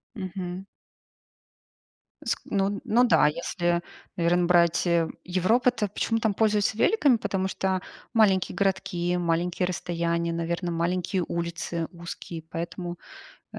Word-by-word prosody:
Мгм. 185 -2 -5 1.6
Ск - - 0
ну, 200 0 0
ну 235 +3 +3
да, 240 - +5
если, 170 +2 0 0.3
наверное, 175 +1 +2
брать, 170 -1 +3
э, 170 -1 +3 0.2
Европу, 190 +8 +2
то 225 -4 -2
почему 225 +3 -1
там 220 -2 +1
пользуются 210 0 +2
великами? 285 - +4
Потому 190 -3 -1
что 190 -1 -1 0.3
маленькие 200 -5 +3
городки, 190 -2 0
маленькие 175 +1 0
расстояния, 170 -1 -1
наверно, 170 +1 -2
маленькие 180 +2 0
улицы, 170 -1 -3
узкие, 170 -1 -7
поэтому, 175 +1 -5 0.6
э, - - -6
180 Hz, 120 wpm, -26 LUFS, 170-195 Hz, 1.6 s, да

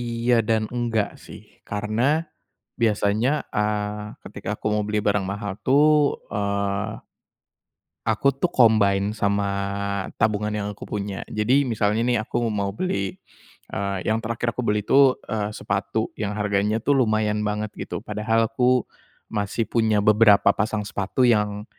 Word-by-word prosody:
iya 120 0 +1
dan 110 -1 +3
enggak 115 -3 0 0.2
sih - - -11 0.3
karena 105 +4 -1 0.8
biasanya, 110 +3 +2 0.3
eee, 105 0 -2 0.2
ketika - - -10
aku - - -19
mau 105 - +1
beli 105 0 0
barang 100 -1 +1
mahal 100 -1 -4
tuh, 150 +3 +5 0.4
eee 100 -1 -1 1.2
aku 135 +5 +2
tuh 175 +5 -1
combine 105 -3 +3
sama 100 -1 +1 0.7
tabungan 105 -1 +1
yang 105 -1 -2
aku - - -9
punya. 100 -2 -4
Jadi, 125 +7 +1
misalnya 110 -2 0
nih 120 -3 +2
aku 115 +1 -2
mau 100 -1 -1
beli, 100 - -2 0.6
eee 100 -1 -2
yang 110 +1 +1
terakhir 115 +1 -2
aku 125 - -3
beli 105 -3 0
itu, 135 +1 +5
eee, 105 -2 -2
sepatu 100 +2 -2
yang 105 -1 -4
harganya 105 +1 +1
tuh 145 - +3
lumayan 110 -2 +1
banget 105 0 -2
gitu - - -6
padahal 110 +2 +1
aku 125 +1 +3 0.5
masih 105 +2 -1
punya 110 -3 +1
beberapa 105 -2 +6
pasang 105 0 -1
sepatu 105 +5 -1
yang, 105 -3 +2
105 Hz, 140 wpm, -23 LUFS, 105-115 Hz, 1.2 s, beberapa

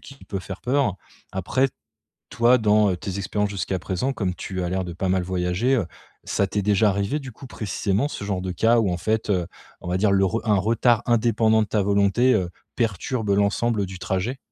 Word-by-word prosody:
qui 135 - -13
peut 95 -2 -4
faire 95 0 -8
peur. 125 -6 +1 0.4
Après, 130 +9 +1 0.6
toi, 120 +3 +4
dans, 105 -2 +3
heu, 90 - -1
tes 95 +1 -5
expériences 105 +1 -1
jusqu'à 95 -1 -2
présent- 100 +10 -2
comme 95 -7 -2
tu 95 -1 -5
as - - -1
l'air 95 +1 -1
de 90 - -6
pas 95 +2 -2
mal 95 0 +1
voyager- 90 +8 0
heu, 105 - 0 0.4
ça 100 - 0
t'est 105 - -1
déjà 105 +1 +3
arrivé, 100 +9 -1
du 130 -3 -9
coup, 135 - -12
précisément, 105 +3 -1
ce 105 - -6
genre 95 -3 -2
de 95 - -3
cas 115 +6 +3
où 100 -5 +1
en 90 - -1
fait, 110 +4 -1
heu, 90 -4 +1 0.3
on - - -8
va 90 - 0
dire, 105 +1 +3
le 95 0 +4
re 115 +5 -1
un 105 -2 +3
retard 115 +3 +2
indépendant 110 -2 +3
de 105 - -3
ta 105 -1 +1
volonté, 100 +5 +3
heu, 90 -4 0 0.2
perturbe 115 0 -1
l'ensemble 100 +1 +1
du 95 0 -8
trajet? 100 +8 -2
100 Hz, 215 wpm, -23 LUFS, 95-115 Hz, 0.6 s, toi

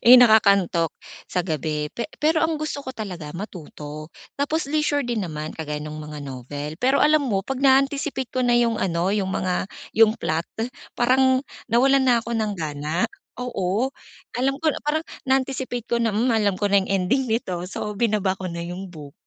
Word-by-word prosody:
eh, 245 - +10
nakakantok, 200 -7 +5 0.3
sa 180 - -1
gabi, 155 -2 -2
pe 235 - -2
pero 315 +2 +3
ang 320 0 +1
gusto 295 -2 -3
ko 260 - -5
talaga, 180 -10 -6
matuto. 155 -5 -8 0.2
Tapos 285 +1 -1
leisure 300 -1 +1
din 240 -5 -2
naman, 155 -2 -5
kagaya 150 -2 -4
no'ng 150 0 -6
mga 150 0 -7
novel. 140 +2 -6
Pero, 265 +2 +3
alam 305 -1 +4
mo, 205 -7 +1
'pag 265 +6 -4
naa-anticipate 275 0 +2
ko 255 - -1
na 240 - +3
yung 235 -1 +3
ano, 175 -2 0
yung 195 -2 0
mga, 185 -1 0 0.3
yung 220 -1 +7
plot, 160 +2 -1 0.5
parang 260 +1 +4 0.3
nawalan 265 +3 +5
na 245 -2 +4
ako 230 - -7
ng 215 -2 0
gana, 155 0 -2 0.3
oo. 235 -1 0 0.5
Alam 270 +2 +2
ko 320 - +3
na - - -4
parang, 305 +2 +1 0.2
na-anticipate 260 -2 -1
ko 235 - +1
na, 230 -2 +1
"Hmm, 230 +5 +2
alam 210 -4 +2
ko 205 - +2
na 200 -1 +4
yung - - -8
ending 260 +9 +1
nito", 185 -6 -2
so 210 +2 -5
binaba 205 -4 +1
ko 190 - -7
na 170 -1 -4
yung 180 +3 -6
book. 150 -4 -10
215 Hz, 185 wpm, -23 LUFS, 170-260 Hz, 0.5 s, eh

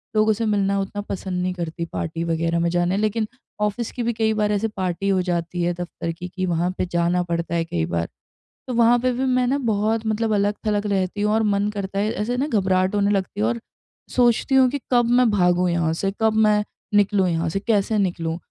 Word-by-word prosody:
लोगों 215 0 +4
से 225 +2 -2
मिलना 200 -2 +1
उतना 195 +1 -3
पसंद 190 -2 -4
नहीं 180 0 -1
करती 170 -1 -4
पार्टी 165 0 -3
वग़ैरह 165 0 0
में 170 0 +1
जाना। 175 +2 +1
लेकिन 215 +1 0 0.3
ऑफ़िस 210 +2 -1
की 245 - -4
भी 235 +1 0
कई 220 0 +1
बार 210 -1 +1
ऐसे 210 +2 +1
पार्टी 185 +1 -1
हो 190 -1 +2
जाती 175 -1 -2
है 175 +1 +1
दफ़्तर 175 -1 -5
की 170 +2 -7
कि 185 +1 -3
वहाँ 175 0 0
पे - - 0
जाना 175 +1 +1
पड़ता 170 0 -2
है 165 -1 0
कई 85 - -1
बार, 85 0 -2 0.6
तो 255 - -3
वहाँ 235 0 +5
पे 255 +1 +1
भी 260 +2 -1
मैं 255 -1 +2
ना 270 +3 +1
बहुत 220 -3 0
मतलब 220 +1 0
अलग-थलग 205 +1 0
रहती 195 0 -1
हूँ 210 +1 +2
और 220 0 +2
मन 205 -1 +1
करता 195 -1 -4
है 210 +2 +1
ऐसे 235 +4 -2
ना 275 +3 0
घबराहट 190 -5 +1
होने 200 0 +2
लगती 195 0 -2
है 210 - +2
और 235 0 -2 0.5
सोचती 245 +2 +3
हूँ 260 -1 +6
कि 285 - -2
कब 240 -1 +4
मैं 250 -2 +4
भागूँ 180 -2 +2
यहाँ 170 -2 +1
से? 195 +4 -1
कब 220 0 +3
मैं 210 -1 +3 0.3
निकलूँ 205 -2 +3
यहाँ 165 0 0
से 195 - -2
कैसे 210 0 +1
निकलूँ? 170 -4 -1
200 Hz, 225 wpm, -22 LUFS, 175-220 Hz, 0.6 s, हूँ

